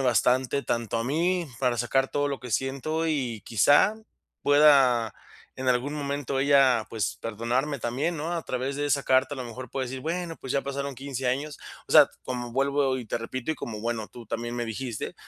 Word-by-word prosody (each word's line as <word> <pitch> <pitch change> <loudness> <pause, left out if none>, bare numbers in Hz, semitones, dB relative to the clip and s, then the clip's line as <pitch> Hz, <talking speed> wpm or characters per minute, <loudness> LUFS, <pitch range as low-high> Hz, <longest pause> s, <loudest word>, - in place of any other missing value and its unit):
bastante. 130 +2 +2
Tanto 115 -1 -1
a 115 - -1
mí, 170 +6 +1
para 125 -2 +1
sacar 135 +3 +1
todo 145 0 0
lo 140 -1 -3
que 125 +1 -9
siento, 140 +7 -1
y 125 -8 -1
quizá, 145 - +4 0.5
pueda 135 -6 +5 0.4
en 130 0 -2
algún 125 +4 +1
momento, 140 -2 -2
ella, 135 -5 +4
pues, 110 -3 -2
perdonarme 120 +6 -1
también, 135 +9 -1
¿no?, 160 +3 -3
a 170 - -2
través 130 +2 -3
de 145 +1 -1
esa 140 -1 +1
carta. 130 +2 +3
A - - -10
lo 130 - -5
mejor 120 +1 -8
puede 130 -1 -2
decir: 130 +1 -6
"Bueno, 165 +3 -3
pues 130 - -5
ya 140 - +1
pasaron 140 -1 -4
15 135 -2 -3
años". 145 +4 -2 0.3
O - - -5
sea, - - +9 0.2
como 125 -1 -4
vuelvo 135 0 +1
y 120 - -7
te - - -2
repito, 130 +5 -3
y - - -6
como 110 -6 -6
bueno, 115 -2 -3
tú 120 -2 -12
también 120 +2 -4
me 120 - -1
dijiste, 115 0 -5
130 Hz, 200 wpm, -27 LUFS, 120-145 Hz, 0.5 s, sea